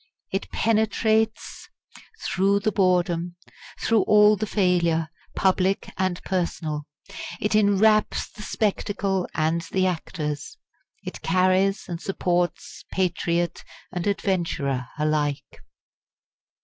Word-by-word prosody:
It 195 - -3
penetrates 220 0 0 0.6
through 200 +2 +2
the 215 - +1
boredom, 180 -3 +1 0.4
through 225 -2 +3
all 210 0 +6
the 215 +1 -3
failure, 170 -5 +1 0.3
public 190 0 +1
and 185 -1 -1
personal; 160 -5 -2 0.5
it 210 - 0
enwraps 215 +1 +3
the 210 - -12
spectacle 200 -3 -1
and 160 +2 +1
the 185 -1 +2
actors; 155 -4 -3 0.5
it - - -7
carries 185 +3 +2
and 170 -2 -5
supports 180 -2 -1
patriot 175 -2 0 0.3
and 180 +1 -3
adventurer 165 -10 -1
alike. 150 -2 -1
185 Hz, 95 wpm, -24 LUFS, 170-200 Hz, 0.6 s, all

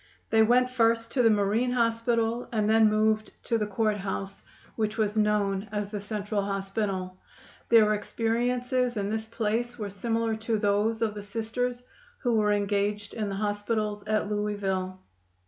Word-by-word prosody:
They 220 - +5
went 250 +3 +4
first 230 -1 +2
to 260 - +2
the 230 - +5
Marine 215 +4 +2
Hospital 230 0 0
and 215 -3 +1
then 220 0 +5
moved 215 0 +1
to 230 - 0
the 210 - -1
Court 210 +1 0
House, 195 0 -5 0.3
which 220 0 -1
was 215 -1 0
known 210 -1 +1
as 205 -1 -3
the 205 -2 -4
Central 205 0 -2
Hospital. 195 -1 -3 0.5
Their 220 -2 +6
experiences 245 +3 0
in 200 0 -1
this 220 0 -2
place 230 +2 -2
were 210 -3 -4
similar 225 +2 -1
to 220 0 -1
those 210 +2 +1
of 215 -2 0
the 210 - -6
Sisters 230 +4 -3 0.3
who 245 -3 0
were 210 -2 +3
engaged 205 0 0
in 215 -2 -2
the 195 - -3
hospitals 205 0 -2
at 215 -1 +1
Louisville. 200 -3 -2
215 Hz, 160 wpm, -27 LUFS, 205-230 Hz, 0.5 s, Their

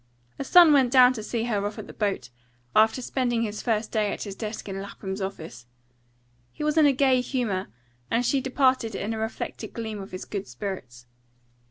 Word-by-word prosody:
Her - - -1
son 335 +2 +7
went 265 -4 +4
down 255 -1 +7
to 225 - -6
see 225 +1 -2
her 215 -4 -1
off 205 +1 -4
on - - -6
the - - -11
boat, 205 - -2 0.4
after 220 +4 +4
spending 240 -3 0
his 210 -1 -4
first 220 -2 -1
day 210 -2 +1
at - - -4
his 200 - -6
desk 215 +1 -6
in 195 0 -4
Lapham's 195 0 -6
office. 160 -11 -6 0.8
He - - -7
was 300 0 +1
in 310 -2 +6
a - - +5
gay 260 -1 +3
humour, 235 -7 -2 0.4
and 240 +2 +1
she 270 +2 +2
departed 260 -4 +1
in 210 +4 -3
a 220 - -4
reflected 220 0 -5
gleam 220 -3 -5
of 195 - -9
his 185 - -6
good 200 -2 -5
spirits. 125 -4 -7
220 Hz, 200 wpm, -26 LUFS, 200-255 Hz, 0.8 s, son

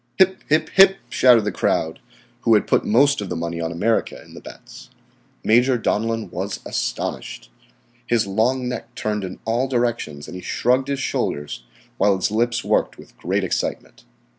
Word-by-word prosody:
"Hip, 190 0 +3
hip, 155 +1 +2
hip," 195 0 +6
shouted 120 -4 +5
the 105 - -1
crowd 85 -5 -1 0.4
who 115 - +4
had 105 - +2
put - - +2
most 140 +4 +3
of 100 - -5
the 90 - -3
money 85 0 -4
on 80 0 -2
America 105 +7 0
in - - -17
the - - -11
bets. - - -13 0.5
Major 125 +3 +4
Donellan 115 -3 -1
was 95 +3 -4
astonished. - - -4 0.6
His 115 -2 +2
long 120 +6 0
neck 125 - -6
turned 105 -1 -2
in 95 -1 -6
all 120 +4 0
directions 120 - -2
and - - -9
he 90 - -7
shrugged 130 +7 +1
his 140 -1 -2
shoulders, 75 - -3 0.3
while 100 -1 +4
his 95 +1 -1
lips 120 +2 0
worked - - 0
with - - -15
great - - -1
excitement. - - -3
115 Hz, 170 wpm, -21 LUFS, 95-125 Hz, 0.6 s, hip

